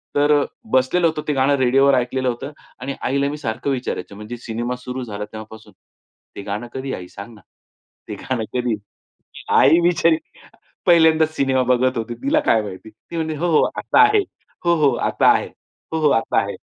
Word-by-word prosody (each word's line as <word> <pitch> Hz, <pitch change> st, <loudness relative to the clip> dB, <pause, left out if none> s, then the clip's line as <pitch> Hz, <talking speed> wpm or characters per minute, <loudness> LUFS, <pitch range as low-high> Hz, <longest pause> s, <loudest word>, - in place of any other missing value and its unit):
तर 145 Hz, +1 st, +3 dB
अ, -, -, -1 dB, 0.3 s
बसलेलं 165 Hz, +7 st, +3 dB
होतं 155 Hz, -1 st, -2 dB
ते 150 Hz, -, +1 dB
गाणं 135 Hz, +1 st, +2 dB
रेडिओवर 135 Hz, +2 st, +4 dB
ऐकलेलं 130 Hz, +1 st, -1 dB
होतं 125 Hz, +4 st, -5 dB, 0.3 s
आणि 135 Hz, +2 st, -3 dB
आईला 140 Hz, +1 st, 0 dB
मी 150 Hz, -, -5 dB
सारखं 120 Hz, 0 st, -3 dB
विचारायचो 125 Hz, -6 st, -4 dB
म्हणजे 105 Hz, +4 st, -8 dB
सिनेमा 120 Hz, +1 st, -4 dB
सुरू 125 Hz, +1 st, -6 dB
झाला 105 Hz, -3 st, -6 dB
तेव्हापासून. 110 Hz, +1 st, -11 dB, 0.6 s
"ते -, -, -6 dB
गाणं 105 Hz, +4 st, -4 dB
कधी 130 Hz, 0 st, -4 dB
आहे -, -, -5 dB
आई 90 Hz, -, -10 dB
सांग 100 Hz, +4 st, -10 dB
ना? 105 Hz, -, -17 dB, 0.7 s
ते -, -, -5 dB
गाणं 130 Hz, -4 st, -3 dB
कधी 125 Hz, -2 st, 0 dB, 0.5 s
आहे?' -, -, -5 dB
आई 165 Hz, -, +6 dB
बिचारी 170 Hz, -2 st, +3 dB, 0.7 s
पहिल्यांदाच 160 Hz, -2 st, +4 dB
सिनेमा 130 Hz, -1 st, +2 dB
बघत 130 Hz, +1 st, +1 dB
होती. 115 Hz, +1 st, -4 dB
तिला 295 Hz, +3 st, +2 dB
काय 110 Hz, -, +2 dB
माहिती. 100 Hz, +1 st, -9 dB
ती 110 Hz, +10 st, -12 dB
म्हणली, 160 Hz, -1 st, -2 dB
'हो, 170 Hz, +4 st, -1 dB
हो -, -, +4 dB, 0.2 s
आता -, -, +4 dB
आहे. 420 Hz, 0 st, +5 dB, 0.4 s
हो 170 Hz, 0 st, +4 dB
हो 140 Hz, -, +5 dB, 0.2 s
आता -, -, +1 dB
आहे. -, -, -1 dB, 0.4 s
हो, 160 Hz, -, 0 dB
हो 150 Hz, -2 st, +3 dB
आता -, -, 0 dB
आहे.' -, -, -5 dB
130 Hz, 190 wpm, -20 LUFS, 115-150 Hz, 0.7 s, आई